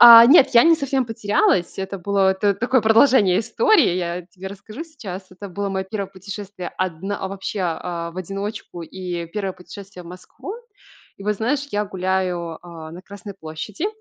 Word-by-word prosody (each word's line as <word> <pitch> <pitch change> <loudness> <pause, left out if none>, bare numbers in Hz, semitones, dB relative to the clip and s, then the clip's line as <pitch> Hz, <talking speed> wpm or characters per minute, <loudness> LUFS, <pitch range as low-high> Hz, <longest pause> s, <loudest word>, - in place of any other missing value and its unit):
А, 235 -1 +12
нет, 275 +1 +7
я 235 - +8
не 330 0 +7
совсем 270 -4 -1
потерялась, 205 -5 +1
это 195 +1 -4
было 195 +1 +2
т 200 +1 +2
такое 245 +5 +2
продолжение 220 -4 +5
истории, 405 - +3
я 175 0 -2
тебе 190 +1 -9
расскажу 215 +7 -9
сейчас. 200 - -8
Это 195 +2 -9
было 200 +2 -3
моё 190 -1 -2
1 200 -3 -3
путешествие, 195 -1 -7
одн 185 +1 -2
вообще, 195 +1 -4
а, 170 0 -3
в 170 - -16
одиночку 195 0 -5
и 175 0 -5
1 195 +2 -3
путешествие 185 +1 -11
в - - -14
Москву. 185 - -9 0.6
И - - -11
вот, 210 0 0
знаешь, 280 +7 -1
я 205 0 +1
гуляю, 185 -3 -1
а, 165 -2 -9
на 175 +2 -10
Красной 200 +1 -10
площади 185 - -5
195 Hz, 170 wpm, -22 LUFS, 180-220 Hz, 0.6 s, А